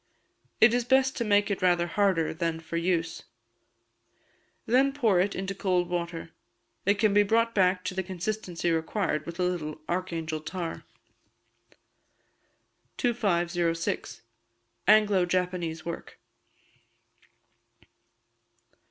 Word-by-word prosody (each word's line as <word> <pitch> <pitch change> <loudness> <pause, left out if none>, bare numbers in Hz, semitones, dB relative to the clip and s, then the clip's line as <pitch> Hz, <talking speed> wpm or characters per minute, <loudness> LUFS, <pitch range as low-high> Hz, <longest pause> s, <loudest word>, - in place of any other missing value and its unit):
It 220 +1 +6
is 245 0 +2
best 265 +2 +3
to 240 - 0
make 205 -1 +2
it 200 - -2
rather 175 -1 +3
harder 185 -3 +1
than 165 0 -2
for 165 +1 -7
use. 165 -1 -1 1.4
Then 265 +4 +3
pour 225 -10 +2
it 195 +3 +1
into 190 +1 -3
cold 180 -2 0
water. 170 -2 -4 0.6
It 200 - +5
can 210 -1 +2
be 205 - +6
brought 230 +3 +2
back 185 -2 +2
to - - -3
the 190 - -1
consistency 180 -1 -3
required 160 -1 -1
with 170 +1 -7
a - - +2
little 160 -4 -2
Archangel 165 -3 -2
tar. 170 +1 -5 2.1
2506. 175 - -1 0.6
Anglo 210 -3 +5
Japanese 180 -3 -2
Work. 170 - -7
180 Hz, 110 wpm, -28 LUFS, 170-205 Hz, 2.1 s, It